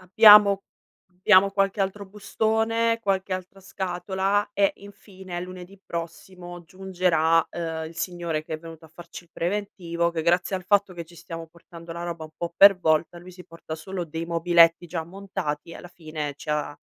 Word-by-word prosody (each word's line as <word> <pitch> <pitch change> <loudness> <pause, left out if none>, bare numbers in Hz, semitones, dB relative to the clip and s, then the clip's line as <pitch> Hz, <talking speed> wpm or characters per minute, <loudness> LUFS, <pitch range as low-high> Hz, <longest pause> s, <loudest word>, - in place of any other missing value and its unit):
abbiamo 205 0 +7 0.6
abbiamo 195 -1 +6
qualche 195 +1 0
altro 195 +1 -2
bustone, 225 +3 0
qualche 195 -3 -1
altra 185 +1 -6
scatola 190 +2 -2
e, 200 -1 +2
infine, 190 -2 -10
lunedì 185 +1 -10
prossimo, 175 0 -8
giungerà, 175 -3 +1
ehm, 160 -2 -4
il 165 - -11
signore 170 -3 -3
che 155 - -6
è - - -5
venuto 165 0 -12
a - - -20
farci 170 +2 -12
il 170 - -27
preventivo, 170 -2 -2
che 165 -1 -3
grazie 175 +3 +1
al 185 - -8
fatto 200 0 +2
che 170 -1 -7
ci 170 +2 -18
stiamo 165 -1 -8
portando 170 0 -12
la 170 +1 -6
roba 170 -2 -5
un 155 - -11
po' 170 0 -5
per 200 -1 +8
volta, 165 0 0
lui 180 +1 -12
si 180 0 -13
porta 165 -1 -9
solo 180 +3 -5
dei 165 +1 -6
mobiletti 170 0 +3
già 165 -1 -4
montati, 175 -4 -5
e - - -9
alla - - -11
fine 155 -4 -6
ci 150 - -7
ha 150 -1 -2
175 Hz, 180 wpm, -25 LUFS, 165-195 Hz, 0.6 s, per